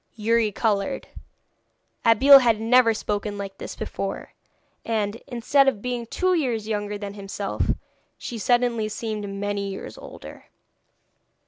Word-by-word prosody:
Youri 225 0 +2
coloured; 205 -2 -1 0.9
Abeille 270 +5 +8
had 230 -4 +2
never 230 +1 +5
spoken 210 -1 -3
like 195 -1 -7
this - - -7
before, - - -5 0.5
and, 215 -1 -1
instead 270 +3 +2
of 260 -6 +2
being 245 +1 -4
two 370 +9 +1
years 245 -10 -1
younger 205 -1 -2
than 200 -1 -6
himself, 200 0 -3 0.5
she 235 - -6
suddenly 240 -1 +1
seemed 215 -2 -4
many 200 0 -3
years 195 - -8
older. - - -11
220 Hz, 125 wpm, -24 LUFS, 205-240 Hz, 0.9 s, Abeille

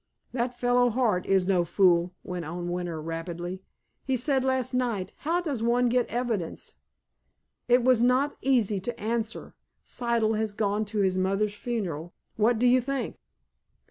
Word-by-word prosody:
"That 245 0 -2
fellow, 245 0 +3
Hart, 225 -6 +1
is 190 -2 +3
no 185 -3 +3
fool," 175 0 +3
went 180 -1 -5
on 175 +2 -5
Winter 175 -2 -3
rapidly. 170 +3 -5 0.4
"He 265 -1 0
said 265 +1 +1
last 260 -2 0
night 235 -7 -1
'How 335 +4 0
does 285 -9 -3
one 240 +1 +2
get 245 0 +1
evidence?' 230 -8 -3 0.9
It 245 0 +4
was 250 -2 +4
not 255 +4 +3
easy 230 -7 +2
to 235 +5 -5
answer. 225 +1 -3 0.3
Siddle 230 -3 0
has 215 -2 -2
gone 210 0 0
to 210 0 -1
his 185 -1 +1
mother's 195 +2 +1
funeral. 190 -8 -4 0.2
What 225 +2 +3
do 245 - +1
you 250 +1 +5
think!" 275 +1 -3
220 Hz, 155 wpm, -27 LUFS, 185-245 Hz, 0.9 s, you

